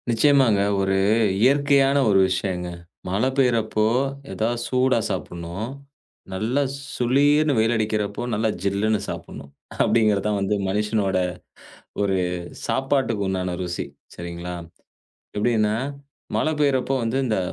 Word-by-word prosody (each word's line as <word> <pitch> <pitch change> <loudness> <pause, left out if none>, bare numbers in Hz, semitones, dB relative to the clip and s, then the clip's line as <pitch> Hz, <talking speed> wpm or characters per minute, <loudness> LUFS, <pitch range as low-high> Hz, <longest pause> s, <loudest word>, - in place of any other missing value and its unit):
நிச்சயமாங்க. 120 -3 +4 0.2
ஒரு 95 0 +1 0.5
இயற்கையான 140 +1 +4
ஒரு 95 -1 +5
விஷயங்க. 90 -1 -2 0.4
மழை 100 +7 +1
பெய்றப்போ, 115 -5 +2 0.5
எதாவது 115 +2 -1
சூடா 130 -1 +2
சாப்புட்ணும், 90 +1 -5 0.7
நல்லா 115 +9 0 0.4
சுளீர்ன்னு 145 +4 +3
வெயில் 110 +2 +3
அடிக்கிறப்போ 105 -2 -1
நல்லா 110 +1 +1
ஜில்லுன்னு 100 +2 +1
சாப்புட்ணும். 70 - -8 0.3
அப்படிங்கிற 110 -3 +3
தான் 105 -1 +1
வந்து 100 +1 0
மனுஷனோட 105 -1 0 0.8
ஒரு. 95 -2 +1 0.5
சாப்பாட்டுக்கு 130 -6 0
உண்டான 90 -2 -2
ருசி, 90 -1 -3 0.3
சரிங்களா. 85 +1 -6 0.8
எப்டின்னா, 110 -1 +2 0.6
மழை 155 - +1
பெய்யிறப்போ 135 -2 +2
வந்து 115 +3 0
இந்த 110 -4 0
110 Hz, 105 wpm, -23 LUFS, 95-130 Hz, 0.8 s, ஒரு